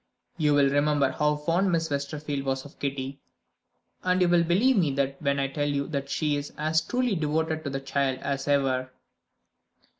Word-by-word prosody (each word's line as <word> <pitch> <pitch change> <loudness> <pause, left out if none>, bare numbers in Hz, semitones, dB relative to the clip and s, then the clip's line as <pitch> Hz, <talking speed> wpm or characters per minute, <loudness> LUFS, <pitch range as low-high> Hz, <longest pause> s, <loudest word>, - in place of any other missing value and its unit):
You 150 -2 +2
will 140 -1 +4
remember 145 -1 +2
how 150 +2 +1
fond 170 +6 +1
Miss 165 -2 0
Westerfield 140 0 -3
was 135 0 -2
of 145 - -14
Kitty, 135 0 -3 0.8
and 185 0 +1
you 180 - +4
will 175 -1 +4
believe 200 +11 +3
me 155 -8 +2 0.2
when 140 -1 0
I 135 - +1
tell 145 +2 -2
you 140 -1 -1
that 140 -2 -3
she 150 +1 0
is 145 0 -5
as 155 +1 +1
truly 245 +6 0
devoted 160 -1 -1
to - - -1
the 135 0 -4
child 135 -1 0
as 140 0 -3
ever." 135 -2 +1
145 Hz, 180 wpm, -27 LUFS, 140-160 Hz, 0.8 s, will